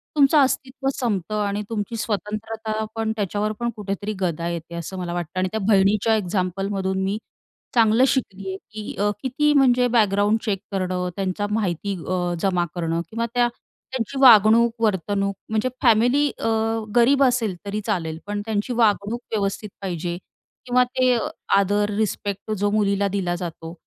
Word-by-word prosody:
तुमचं 285 +1 +5
अस्तित्व 270 0 0
संपतं. 210 -3 -1
आणि 200 +1 -2
तुमची 220 0 -3
स्वतंत्रता 215 +1 -3
पण 225 -1 -1
त्याच्यावर 210 0 -1
पण 235 0 0
कुठेतरी 205 0 -4
गदा 170 -3 -1
येते 170 0 -6
असं 170 +3 -6
मला 175 -1 -4
वाटतं. 175 +1 -4
आणि 185 - +1
त्या 220 - -2
बहिणीच्या 210 +2 +4
एक्झाम्पलमधून 190 0 -1
मी 195 +2 -1 0.6
चांगलं 225 +1 +5
शिकली 195 -8 -2
आहे 190 - -4
की 215 -1 -6
अ, 205 +1 +2
किती 295 +3 +2
म्हणजे 250 -3 +4
बॅकग्राऊंड 205 0 +3
चेक 200 -4 0
करणं, 185 -2 -1
त्यांची 195 +1 -2
माहिती 200 -2 -1
अ, 180 -1 -1
जमा 180 -3 +1
करणं 165 -1 -1
किंवा 230 +1 -2
त्या 245 -1 +3 0.4
त्यांची 260 +1 -3
वागणूक, 230 -1 +7
वर्तणूक. 200 0 0
म्हणजे 220 +4 0
फॅमिली 245 +5 +4
अ, - - -1 0.5
गरीब 270 +4 +5
असेल 240 -7 +2
तरी 205 +1 -3
चालेल 165 -7 -2
पण 205 0 -2
त्यांची 220 +2 -1
वागणूक 220 -1 +1
व्यवस्थित 210 0 -2
पाहिजे. 175 -2 -3 0.5
किंवा 250 0 +4
ते 250 0 +2 0.4
आदर, 205 +1 +2
रिस्पेक्ट 205 -1 -2
जो 205 +1 +1
मुलीला 200 -1 +2
दिला 185 -3 -1
जातो 165 -2 -6
205 Hz, 150 wpm, -23 LUFS, 190-225 Hz, 0.6 s, वागणूक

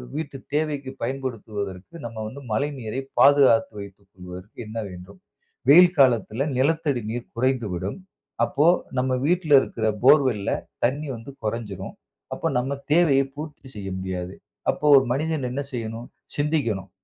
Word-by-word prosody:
வீட்டு 150 -3 -4 0.2
தேவைக்கு 145 -3 -1
பயன்படுத்துவதற்கு 110 - -5
நம்ம 115 -1 -7
வந்து 135 +6 -9
மழைநீரை 130 -1 -2 0.2
பாதுகாத்து 135 -6 +6
வைத்து 100 0 -10
கொள்வதற்கு 90 0 -12
என்ன 110 +1 -7
வேண்டும்? 90 - -12 0.5
வெயில் 175 +4 +8
காலத்துல 120 -2 +3
நிலத்தடி 145 -1 +1
நீர் 120 +1 -6
குறைந்துவிடும். 115 - -1 0.5
அப்போ 145 +6 +2 0.3
நம்ம 130 +1 +1 0.2
வீட்டுல 170 -3 +2
இருக்குற 110 - -2 0.2
போர்வெல்‌ல 130 -7 +4 0.3
தண்ணீ 140 +5 0
வந்து 115 +4 -9
கொறந்சுரும். 105 -3 -4 0.4
அப்போ - - -2
நம்ம 130 +3 -1 0.2
தேவையை 150 -4 +5
பூர்த்தி 150 -2 -8
செய்ய 100 -2 -5
முடியாது. 95 -1 -4 0.4
அப்போ - - -1
ஒரு 135 - +4
மனிதன் 150 0 -1
என்ன 135 +3 -2
செய்யணும்? 115 -1 -5 0.3
சிந்திக்கணும். 130 - -1
125 Hz, 125 wpm, -24 LUFS, 105-145 Hz, 0.5 s, வெயில்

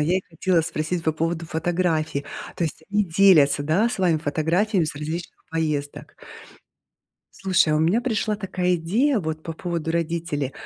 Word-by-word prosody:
я 170 +5 +2
и 190 - -2
хотела 165 +1 +1
спросить 165 +1 -3
по 160 - +2
поводу 165 +1 -2
фотографий. 160 -3 -1 0.3
То 170 - 0
есть 160 0 -5
они 205 0 +2
делятся, 160 -6 +5
да, 175 +10 +2
с 235 - -5
вами 175 -4 +3
фотографиями 165 +6 +1
с 145 - -5
различных 160 +4 -5
поездок? 150 -3 -3 1.3
Слушай, 185 -4 +3
а - - +3
у - - +2
меня 170 +9 +3
пришла 220 -3 -1
такая 185 -3 -1
идея 215 - +1
вот 155 -1 -4
по 165 - -4
поводу 165 -1 -3
родителей. 165 -5 -2
165 Hz, 165 wpm, -23 LUFS, 155-185 Hz, 1.3 s, делятся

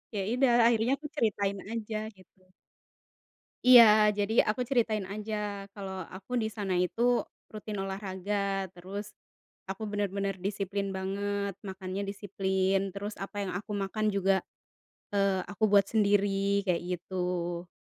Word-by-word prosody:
Ya 200 - 0
idah 250 -1 +3 0.2
akhirnya 230 +2 +2
aku 300 +1 -7
ceritain 205 -6 0 0.2
aja 220 -1 -3 0.2
gitu. 185 0 -23 1.1
Iya, 220 -4 +8
jadi 210 +2 +2
aku 215 +4 -1
ceritain 220 -6 +1
aja 210 0 -4
kalo 190 -2 -6
aku 195 +7 -6
di 220 -2 0
sana 200 -3 -2
itu 240 +6 +2 0.2
rutin 215 -1 -6
olahraga, 195 0 -2
terus 195 +4 -7 0.6
aku 195 +3 -6
bener-bener 200 -1 -1
disiplin 200 -1 -2
banget, 200 +1 -2
makannya 190 0 -4
disiplin, 195 -1 0
terus 205 +1 -5
apa 195 +1 -7
yang 185 - -3
aku 210 +3 -5
makan 210 +1 -1
juga, 195 -1 +2 0.7
eee, 195 -2 +2
aku 205 +2 -1
buat 200 -2 +7
sendiri 200 -1 +2
kayak 180 -3 +1 0.2
gitu. 175 -1 -3
200 Hz, 130 wpm, -29 LUFS, 190-210 Hz, 1.1 s, Iya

